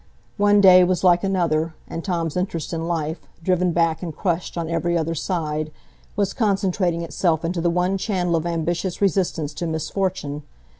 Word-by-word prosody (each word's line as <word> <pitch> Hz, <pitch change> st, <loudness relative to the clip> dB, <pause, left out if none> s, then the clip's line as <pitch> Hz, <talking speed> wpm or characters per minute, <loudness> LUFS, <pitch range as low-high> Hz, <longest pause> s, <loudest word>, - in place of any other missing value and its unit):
One 205 Hz, 0 st, +4 dB
day 185 Hz, -2 st, +8 dB
was 180 Hz, +1 st, +1 dB
like 175 Hz, 0 st, +5 dB
another; 165 Hz, -4 st, 0 dB
and 165 Hz, -, -5 dB
Tom's 170 Hz, -5 st, -2 dB
interest 180 Hz, -3 st, -2 dB
in 165 Hz, 0 st, -2 dB
life, 160 Hz, -1 st, -2 dB, 0.2 s
driven 180 Hz, 0 st, +2 dB
back 165 Hz, -1 st, +1 dB
and 165 Hz, -4 st, -5 dB
crushed 175 Hz, -2 st, -2 dB
on 165 Hz, -1 st, -2 dB
every 170 Hz, +1 st, 0 dB
other 165 Hz, 0 st, -1 dB
side, 155 Hz, -2 st, -2 dB, 0.4 s
was 200 Hz, -1 st, 0 dB
concentrating 190 Hz, -5 st, 0 dB
itself 165 Hz, -1 st, 0 dB
into 170 Hz, 0 st, -1 dB
the 170 Hz, -, +2 dB
one 180 Hz, +3 st, 0 dB
channel 180 Hz, -4 st, 0 dB
of 165 Hz, +1 st, -1 dB
ambitious 170 Hz, +2 st, -2 dB
resistance 180 Hz, -6 st, 0 dB
to 170 Hz, +3 st, -3 dB
misfortune. 160 Hz, -2 st, -2 dB
175 Hz, 165 wpm, -22 LUFS, 165-185 Hz, 0.4 s, day